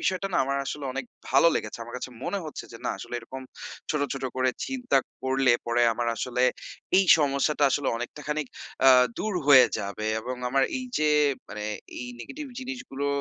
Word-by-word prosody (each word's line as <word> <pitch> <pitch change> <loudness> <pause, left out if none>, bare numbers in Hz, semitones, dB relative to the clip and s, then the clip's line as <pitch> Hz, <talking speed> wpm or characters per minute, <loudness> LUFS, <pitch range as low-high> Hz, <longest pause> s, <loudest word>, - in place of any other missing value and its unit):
বিষয়টা 190 +1 0
না - - +2
আমার 140 +1 -1
আসলে 145 -1 -4
অনেক 135 -1 -3 0.3
ভালো 135 +5 +6
লেগেছে। 105 +2 -3
আমার 120 +1 -9
কাছে 125 - -6
মনে 200 - -1
হচ্ছে 155 - -7
যে - - -8
না - - +1
আসলে 120 - -8
এরকম 130 +3 -8 0.5
ছোট, 150 - 0
ছোট 135 - -5
করে 130 0 +2 0.2
চিন্তা 255 - +1 0.2
করলে 130 -1 +3
পরে 120 +1 +2
আমার 120 0 -1
আসলে 125 0 -1 0.6
এই 195 - +4
সমস্যাটা 145 +1 +2
আসলে 145 +1 0
অনেকটা 120 +5 -6
খানিক, 150 -1 -1 0.4
আ - - +10 0.3
দূর 215 -1 -2
হয়ে 135 -3 +9
যাবে 100 +2 -4
এবং 125 +2 -5
আমার 135 +1 +2 0.2
এই 255 - -5
যে 155 0 +2 0.4
মানে 105 0 -6 0.3
এই 125 - -5
negative 290 - -7
জিনিসগুলো 255 - -5
135 Hz, 180 wpm, -27 LUFS, 125-155 Hz, 0.6 s, আ